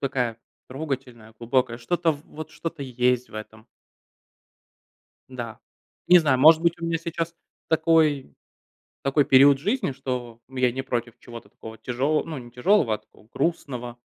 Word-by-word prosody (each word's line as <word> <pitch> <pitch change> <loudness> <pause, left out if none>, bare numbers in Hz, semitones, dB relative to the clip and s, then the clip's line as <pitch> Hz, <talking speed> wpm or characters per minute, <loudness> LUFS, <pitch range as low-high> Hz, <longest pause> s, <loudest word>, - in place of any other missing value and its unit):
такая 125 -4 -1 0.3
трогательная, 130 -5 -6
глубокая. 120 0 0
Что-то 165 +6 0
в 145 - -10
вот, 155 +1 -9
что-то 165 -3 -6
есть 125 -1 0
в - - -16
этом. 110 0 -9 1.6
Да. 120 -4 -7 0.5
Не 180 0 +9
знаю, 145 -5 +2
может 155 +4 +7
быть, 170 0 +2
у - - -4
меня 165 0 0
сейчас 165 0 -4 0.3
такой 160 -4 +2 0.7
такой 140 +1 +2
период 135 +1 +6
в - - -16
жизни, 225 - 0
что 125 -3 -5
я 130 -1 +1
не 130 +2 -3
против 120 -3 -4
чего-то 120 -1 -11
такого 110 0 -11
тяжелого, 130 +7 0
ну, 160 -3 -6
не 120 -1 -12
тяжелого, 125 - +3
а - - -5
такого - - -24
грустного, 125 -7 -2
130 Hz, 155 wpm, -25 LUFS, 120-160 Hz, 1.6 s, Не